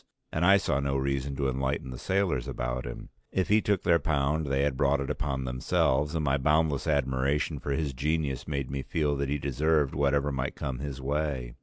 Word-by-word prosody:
And 80 - -1
I 100 +3 +7
saw 75 -8 0
no 70 -1 0
reason 70 0 -1
to 70 0 0
enlighten 65 0 -2
the 60 - -7
sailors 95 -10 0
about - - -3
him; - - -7 0.2
if 95 - 0
he 105 +1 +5
took 100 -3 0
their 85 -1 +4
pound 75 +1 0
they 70 0 +1
had 70 -2 +1
brought 70 +1 +2
it 70 - -2
upon 70 -2 -2
themselves, 65 +4 +1
and 80 -2 0
my 70 0 +2
boundless 75 +1 +2
admiration 70 +1 +1
for - - -6
his 70 -1 -1
genius 75 0 -1
made 70 -3 -3
me 70 0 -2
feel 75 +1 0
that 70 0 -1
he 70 - 0
deserved 75 +2 +1
whatever 70 0 +1
might 65 0 -2
come 65 -2 -4
his 70 -1 -5
way. 70 -3 -2
70 Hz, 205 wpm, -28 LUFS, 65-75 Hz, 0.2 s, I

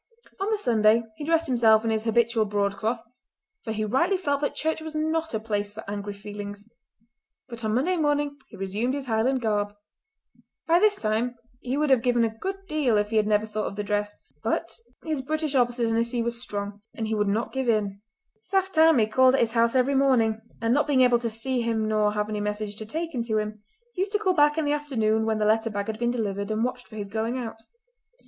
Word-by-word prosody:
On 390 +2 -1
the 435 - +1
Sunday 225 - +3
he - - -6
dressed 330 +2 +2
himself 230 -4 +4
in 225 - +1
his 220 0 -1
habitual 230 -1 +2
broadcloth, 205 +3 -1 0.6
for 225 - -4
he 215 0 -1
rightly 275 - +2
felt 285 -6 -1
that 290 - -1
church 320 0 -1
was 315 0 -7
not 320 +1 -1
a - - 0
place 205 -2 -2
for 215 0 -10
angry 205 0 -4
feelings; 205 0 -8 0.8
but 235 -2 -9
on 215 0 0
Monday 350 +9 +1
morning 290 -2 +1
he - - -12
resumed 205 +7 -1
his 280 -2 -4
Highland 250 +3 +1
garb. 205 -2 0 0.9
By 335 +1 +4
this 420 +1 +4
time 230 - -1 0.2
he 255 +2 -3
would 300 -1 +1
have 260 -3 +5
given 240 -1 +2
a 225 -1 -3
good 390 +9 -5
deal 280 -8 +2
if 210 +1 0
he 220 - +2
had 210 -1 +3
never 210 0 +2
thought 215 0 -3
of - - -6
the 205 - -3
dress, 205 0 -1 0.3
but 225 0 -1 0.3
his 310 -4 -1
British 310 +2 -2
obstinacy 235 -1 +1
was 235 0 -3
strong, 205 -3 -5
and 225 - -3
he 220 - -2
would 210 -1 +1
not 215 +4 -1
give 265 -2 -1
in. 205 -3 0 0.4
Saft 385 - 0
Tammie 315 -8 +5
called 255 +4 +4
at - - +2
his 230 -1 +2
house 230 +1 +2
every 260 +2 +3
morning, 245 -5 +3 0.2
and, 230 +1 +1
not 295 +3 +2
being 275 -3 +3
able 245 -2 +5
to 235 -1 -2
see 240 +3 -2
him 225 -2 0
nor 215 -1 +2
to 210 - -5
have 210 0 0
any 215 -1 -3
message 210 0 -3
taken 320 -4 -3
to 220 -2 0
him, 215 0 -3 0.3
used 390 +2 -2
to - - +4
call 390 -3 +1
back 295 -2 +4
in 320 - +1
the 290 - +2
afternoon 225 -7 0
when 220 -1 +1
the 210 - +1
letter 220 +2 +2
bag 200 -1 -3
had 220 0 -5
been 240 0 +1
delivered 200 -4 -2
and 215 +1 0
watched 250 0 -3
for 215 - -13
his 205 -2 -4
going 225 +4 -2
out. 225 -3 -5
230 Hz, 225 wpm, -26 LUFS, 215-275 Hz, 0.9 s, have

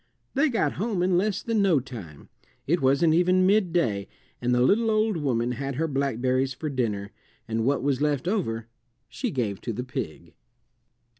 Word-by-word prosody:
They 290 +3 +3
got 230 - +1
home 205 -5 0
in 180 0 +2
less 200 +3 0
than 225 -2 +1
no 185 -7 +4
time; 110 - -10 0.4
it 170 +5 +1
wasn't 140 +5 +4
even 180 +2 +4
midday, 170 - +2 0.3
and 120 0 0
the 125 0 +3
little 225 - +3
old 215 -1 +2
woman 125 -6 0
had 135 +2 -4
her 160 +4 0
blackberries 130 -2 0
for 155 +4 -4
dinner, 105 -6 -2 0.4
and 115 +1 -1
what 140 -1 +1
was 140 -1 0
left 150 0 0
over 115 - -1 0.4
she 255 - -3
gave 110 - -2
to 115 - -3
the 125 +3 -4
pig. 85 -9 -6
140 Hz, 170 wpm, -26 LUFS, 120-185 Hz, 0.4 s, no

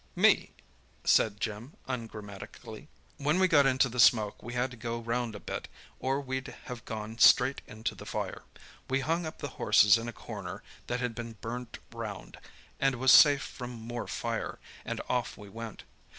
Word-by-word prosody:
"Me," - - +4 0.5
said 105 -2 +3
Jim 110 +6 -4
ungrammatically. 110 0 -7 0.3
"When 150 +4 +1
we 185 0 +5
got 145 -5 +5
into 130 0 +3
the 125 +1 -6
smoke 110 -3 +5
we 120 +2 -7
had 125 +1 0
to - - -9
go 115 +1 -3
round 115 -1 -2
a - - -6
bit, - - -5 0.3
or 135 +1 0
we'd 130 -1 -4 0.2
have 125 -2 -7
gone 110 0 -6
straight 130 +3 +6
into 110 +1 -4
the - - -11
fire. - - -3 0.5
We 135 +1 +1
hung 165 +4 0
up 155 - -8
the - - -4
horses 105 0 +6
in 115 - -5
a - - -3
corner - - -7 0.2
that 125 +1 -2
had 125 -2 -1
been 115 0 -6
burnt 115 +2 -6 0.2
round, 110 -5 -7 0.4
and 135 -1 +2
was 130 +1 +4
safe 140 0 +8
from 125 -1 -7
more 120 +1 -6
fire, - - -3 0.3
and - - -3
off 125 -1 -1
we 105 -1 -11
went. 115 +1 -8
120 Hz, 180 wpm, -30 LUFS, 110-130 Hz, 0.5 s, safe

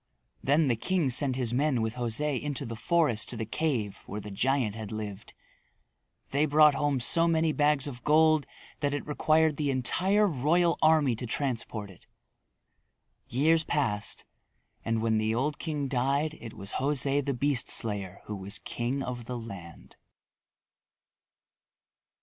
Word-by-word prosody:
Then 145 +3 +3
the 120 - +2
king 165 +3 0
sent 130 +1 0
his 125 -3 -2
men 135 0 +1
with 110 0 -1
José 125 +3 -1
into 145 -1 -3
the 115 -1 -5
forest 120 -1 +1
to 120 - -6
the 110 - -3
cave 115 -5 -1
where 105 - -5
the 105 0 -8
giant 125 +1 +1
had 110 -1 -7
lived. 105 -2 -7 1.0
They 145 +3 +2
brought 150 0 +6
home 145 -2 0
so 165 +7 +3
many 160 -1 +2
bags 150 -2 +2
of 125 -4 -7
gold 155 0 +4 0.3
that 145 -1 0
it 145 - -4
required 155 0 +2
the 145 -2 0
entire 185 +11 +2
royal 170 +2 +2
army 155 -6 +4
to 125 - -5
transport 115 -5 -3
it. 90 - -19 1.2
Years 160 +6 +3
passed, 115 -10 -2 0.6
and 115 -1 -1
when 110 -1 +2
the 110 +1 0
old 145 +5 -1
king 150 -4 -2
died 140 +4 0
it 115 -2 -9
was 100 -1 -6
José 140 +1 +1
the 140 -1 -2
Beast 140 0 0
Slayer 100 -4 -2
who 105 - -5
was 100 +1 -4
king 125 +3 -3
of 120 -2 -5
the 125 +1 -4
land. 100 -8 -10
135 Hz, 155 wpm, -28 LUFS, 115-150 Hz, 1.2 s, brought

